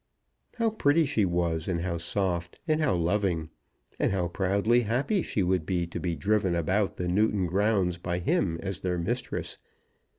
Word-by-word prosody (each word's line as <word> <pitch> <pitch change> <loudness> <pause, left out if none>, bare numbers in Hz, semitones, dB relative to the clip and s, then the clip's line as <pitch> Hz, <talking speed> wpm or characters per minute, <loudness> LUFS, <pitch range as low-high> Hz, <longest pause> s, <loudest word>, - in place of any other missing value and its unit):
How 230 -2 +1
pretty 165 -6 +3
she 110 -7 +1
was, 85 -2 -1
and 85 -3 -1
how 85 -1 -2
soft, 85 0 -2
and 155 0 +2
how 150 -10 +2
loving! 85 -2 0 0.5
And - - +2
how 90 -3 0
proudly 100 +6 +2
happy 125 - 0
she 100 - -1
would 90 -2 +1
be 85 +1 -1
to 85 - -6
be 85 -2 -2
driven 100 -1 +1
about 95 +5 0
the 90 - -2
Newton 100 +1 +2
grounds 95 -1 +1
by 85 0 -2
him 85 -1 0
as 95 -1 -3
their 90 -2 -1
mistress. 120 +9 -3
95 Hz, 170 wpm, -28 LUFS, 85-105 Hz, 0.5 s, pretty